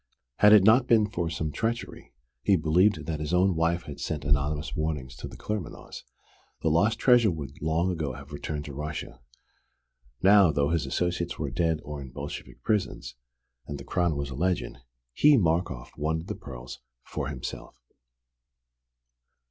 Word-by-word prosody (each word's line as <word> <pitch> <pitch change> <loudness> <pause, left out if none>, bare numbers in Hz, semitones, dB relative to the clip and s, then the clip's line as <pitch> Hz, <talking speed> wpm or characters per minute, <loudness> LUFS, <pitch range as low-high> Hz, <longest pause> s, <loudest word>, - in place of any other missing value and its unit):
Had 105 - +7
it 105 -3 +8
not 120 +5 +5
been 110 -3 +5
for 85 -5 -2
some 80 -1 -3
treachery 115 +7 -3 0.3
(he 100 - +4
believed 85 +1 +2
that 80 -1 -3
his 75 +3 -1
own 95 +1 +4
wife 85 +1 +1
had - - -9
sent 75 -3 -3
anonymous 75 +2 0
warnings 75 -5 -3
to - - -6
the - - -11
Claremanaghs) 105 -6 -5 0.6
the 80 - +3
lost 105 +8 +3
treasure 120 -3 +5
would 75 -6 -6
long 80 +4 +1
ago 80 -6 -3
have 70 +2 -11
returned 75 0 -4
to 70 - -7
Russia. 75 -3 -6 1.0
Now, 100 -2 +7
though 70 -1 +1
his 80 -4 0
associates 85 +3 -1
were 70 -4 -3
dead 80 +3 0
or 75 -1 -6
in 65 - -8
Bolshevik 70 +3 -8
prisons, 95 - -1 0.5
and 75 - -5
the 70 - -9
crown 85 -1 0
was 70 -1 -4
a - - -5
legend, 90 -3 -1 0.3
he 145 - +6
Markoff 85 - 0
wanted 80 +2 -2
the - - -4
pearls - - -9 0.3
for 70 - -4
himself. 70 -3 -7
80 Hz, 165 wpm, -27 LUFS, 70-90 Hz, 1.0 s, it